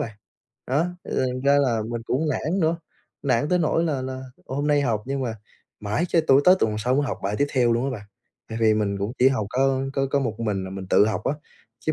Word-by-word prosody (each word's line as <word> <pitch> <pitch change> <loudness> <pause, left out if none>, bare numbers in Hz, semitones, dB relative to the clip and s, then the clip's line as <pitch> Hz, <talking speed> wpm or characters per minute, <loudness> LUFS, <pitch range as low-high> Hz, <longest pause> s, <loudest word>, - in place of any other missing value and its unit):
bạn. 110 - -16 0.5
Đó, 145 +7 +1 0.3
thành 130 0 0
ra 140 +1 +5
là 120 -6 +1
mình 115 -1 -3
cũng 145 +7 -1
nản 160 +7 -1
nữa, 165 0 +2 0.5
nản 135 0 +1
tới 180 +1 +2
nỗi 165 0 +1
là 140 -5 -1
là 130 0 -5 0.2
hôm 140 +3 -2
nay 145 -1 +3
học 115 -6 0
nhưng 135 0 -2
mà 115 -3 -2 0.5
mãi 105 +10 -1
cho 165 - +3
tụ 140 -3 +5
tới 180 +5 +6
tuần 110 -1 0
sau 125 +4 +1
mới 145 - +2
học - - -3
bài 100 +2 -1
tiếp 145 - +3
theo 120 -3 +3
luôn 120 +3 0
á 135 - -1
bạn. 110 -5 -6 0.5
Tại 110 - -5
vì 110 -1 +5
mình 100 -2 -1
cũng 100 +4 -2
chỉ 130 - +6
học 110 -7 -1
có 135 +1 +2 0.3
có 140 - +2
một 115 -4 -3
mình 105 -4 -1
à, - - -5
là 95 - -7
mình 95 -1 -6
tự 105 - +5
học 110 - -2
á, - - +1 0.5
chứ 155 - -1
130 Hz, 250 wpm, -24 LUFS, 110-145 Hz, 0.5 s, tới